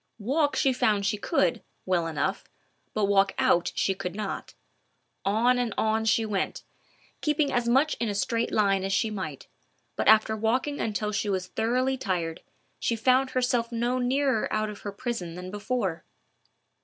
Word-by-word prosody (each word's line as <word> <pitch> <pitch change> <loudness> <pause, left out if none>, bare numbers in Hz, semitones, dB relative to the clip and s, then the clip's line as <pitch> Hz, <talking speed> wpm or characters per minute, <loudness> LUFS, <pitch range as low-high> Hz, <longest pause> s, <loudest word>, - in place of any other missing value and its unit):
Walk 285 +7 +1
she 270 -2 +3
found 210 -5 +1
she 200 +1 0
could, 180 -4 +1 0.2
well 175 -3 +1
enough, 165 +5 -1 0.5
but 215 -1 +2
walk 195 0 +3
out 170 - +3
she 195 - +1
could 185 -1 -5
not. 210 -2 -5 0.7
On 235 +5 +3
and 235 -4 -1
on 220 0 +1
she 225 0 +3
went, 205 -3 -2 0.6
keeping 300 -1 +1
as 240 -1 +1
much 275 +5 +3
in 235 - 0
a 205 - -2
straight 230 +3 0
line 195 -2 +2
as 195 - -2
she 215 +3 +1
might, 155 -9 -5 0.5
but - - -1
after 220 0 +5
walking 250 +7 0
until 210 -1 -1
she 210 0 -1
was 190 -2 -1
thoroughly 255 +6 0
tired, 175 -8 -2 0.4
she 230 - 0
found 255 +3 +3
herself 245 -2 0
no 240 +2 0
nearer 260 -1 +1
out 215 0 0
of 205 - -10
her 205 - -5
prison 200 -6 -4
than 180 +1 -7
before. 205 -5 -2
215 Hz, 165 wpm, -27 LUFS, 195-245 Hz, 0.7 s, after